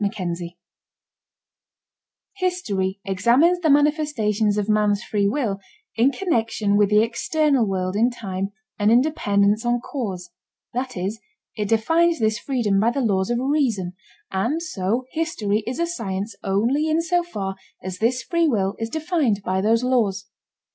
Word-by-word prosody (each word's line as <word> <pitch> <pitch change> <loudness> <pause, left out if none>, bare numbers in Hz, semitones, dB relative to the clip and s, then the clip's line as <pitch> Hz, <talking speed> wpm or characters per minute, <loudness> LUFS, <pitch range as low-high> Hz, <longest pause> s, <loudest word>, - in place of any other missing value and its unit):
CHAPTER 200 -4 -2
XI 170 0 -7 1.8
History 205 - -1
examines 245 - +3
the 325 -3 +1
manifestations 280 -9 +2
of 205 -1 -1
man's 210 0 +2
free 205 -2 0
will 215 -4 -1 0.4
in 240 +5 +4
connection 225 - 0
with 205 -1 +4
the 210 +1 +5
external 270 +2 +1
world 185 -1 -2
in 230 +4 +3
time 195 -5 -4 0.3
and 210 +1 +3
in 240 +2 +6
dependence 210 -7 +1
on 240 0 +1
cause, 195 -9 -5 0.4
that 250 -2 -3
is, 195 +5 -3 0.4
it 210 -2 -2
defines 325 +10 +3
this 220 -1 0
freedom 230 -8 0
by 220 +3 +3
the 270 +3 -1
laws 195 -4 +1
of 240 - +1
reason, 250 -10 0 0.4
and 240 - -1
so 230 - -2
history 220 -11 -1
is 245 - -3
a 340 - +1
science 210 - -4
only 235 +11 +1
in 315 +1 +2
so 350 +1 +1
far 200 - -5 0.3
as 185 0 -5
this 240 +2 +1
free 335 +3 +1
will 200 -8 +1
is 225 0 -3
defined 305 - 0
by 190 0 0
those 225 +4 +2
laws. 215 -6 +1
225 Hz, 155 wpm, -22 LUFS, 200-280 Hz, 1.8 s, in